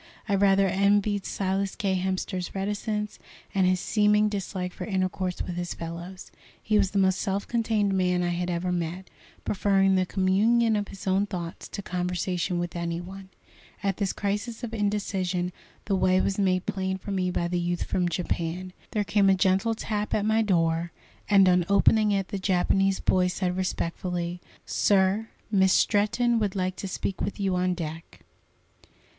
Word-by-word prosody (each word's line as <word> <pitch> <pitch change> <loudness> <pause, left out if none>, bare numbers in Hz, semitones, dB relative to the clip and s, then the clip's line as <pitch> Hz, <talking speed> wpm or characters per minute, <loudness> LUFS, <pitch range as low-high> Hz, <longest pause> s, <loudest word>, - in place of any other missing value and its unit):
I 200 - 0
rather 195 0 +4
envied 200 +1 +2
Silas 195 0 -1
K. 195 -2 0
Hemster's 185 0 -2
reticence, 210 +2 -3 0.3
and 190 -2 +3
his 185 0 +2
seeming 210 +1 +3
dislike 190 -3 -4
for - - -6
intercourse 185 -2 -1
with 175 -1 -5
his 175 0 -3
fellows. 170 +3 -7 0.3
He 215 -1 +2
was 195 -2 +2
the 200 - -3
most 190 -1 +2
self 200 -1 -2
contained 220 -4 +1
man 180 -1 +1
I 175 - 0
had 175 +1 -2
ever 175 +1 -1
met, 175 +1 -3 0.3
preferring 195 -1 +2
the 185 -1 +2
communion 215 +5 +3
of 205 -1 -1
his 195 - -10
own 195 +2 +2
thoughts 175 -4 -6
to 200 - -7
conversation 180 0 -2
with 175 0 -3
any 170 0 -2
one. 190 +2 -9 0.5
At 195 -2 0
this 200 -3 0
crisis 210 +4 -3
of 230 -1 -5
indecision 195 -4 -1 0.3
the 200 - +1
way 185 0 +3
was 195 +1 0
made 185 -2 +1
plain 190 -1 -2
for 200 - -7
me 185 -2 0
by 175 -1 -1
the 175 0 -1
youth 175 0 -1
from 180 -1 0
Japan. 175 +1 -3 0.2
There 210 -2 +1
came 205 -1 +3
a 190 - +5
gentle 190 +4 +2
tap 210 -1 -2
at 205 - 0
my 220 +1 +3
door, 170 -4 +1 0.4
and 195 -2 +6
on 180 -1 +4
opening 210 +2 +4
it 195 -2 0
the 200 - -3
Japanese 195 +1 +2
boy 185 -1 +2
said 180 0 -1
respectfully: 175 -1 -3 0.2
"Sir, 200 +2 +2 0.2
Miss 190 -2 +4
Stretton 230 +3 +2
would 205 -2 -1
like 185 -1 -1
to 195 - -5
speak 190 +1 -4
with 205 - -3
you 195 -2 0
on 180 0 +1
deck." 165 -1 -7
190 Hz, 175 wpm, -26 LUFS, 180-205 Hz, 0.5 s, and